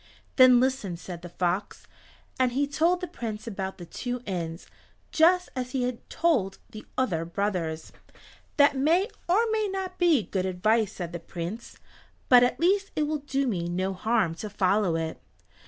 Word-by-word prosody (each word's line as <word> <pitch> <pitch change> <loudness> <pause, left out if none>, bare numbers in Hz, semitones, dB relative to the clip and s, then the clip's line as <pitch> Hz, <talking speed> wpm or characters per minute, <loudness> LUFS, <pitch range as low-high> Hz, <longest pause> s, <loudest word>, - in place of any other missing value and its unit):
"Then 255 -2 +7
listen," 250 -9 0
said 175 -1 -8
the 175 - -9
fox; 180 +3 -2 0.5
and 255 -1 +2
he 280 +3 +2
told 330 +5 +1
the 360 - -3
Prince 220 -6 -6
about 195 -4 -5
the 175 - -9
two 245 +7 -5
inns, 170 -4 -4 0.5
just 360 +3 +4
as 255 0 -4
he 260 -2 0
had 245 -1 -4
told 245 - +1
the 215 - -10
other 185 -11 0
brothers. 170 -3 -3 0.7
"That 285 -1 +5
may 330 - +2 0.2
or 420 +6 +4
may 435 -1 +1
not 380 -1 -5
be 335 - +4
good 190 -1 -2
advice," 215 +4 +1
said 175 -2 -6
the 175 - -4
Prince, 175 +7 -7 0.5
"but 250 -1 +8
at 245 - +2
least 390 +4 +2
it 305 - +1
will 300 0 -1
do 275 -1 -1
me 175 -8 -2
no 185 +2 -1
harm 205 -2 +1
to 215 - -5
follow 195 -2 +1
it." 160 -1 -3
230 Hz, 170 wpm, -27 LUFS, 185-285 Hz, 0.7 s, but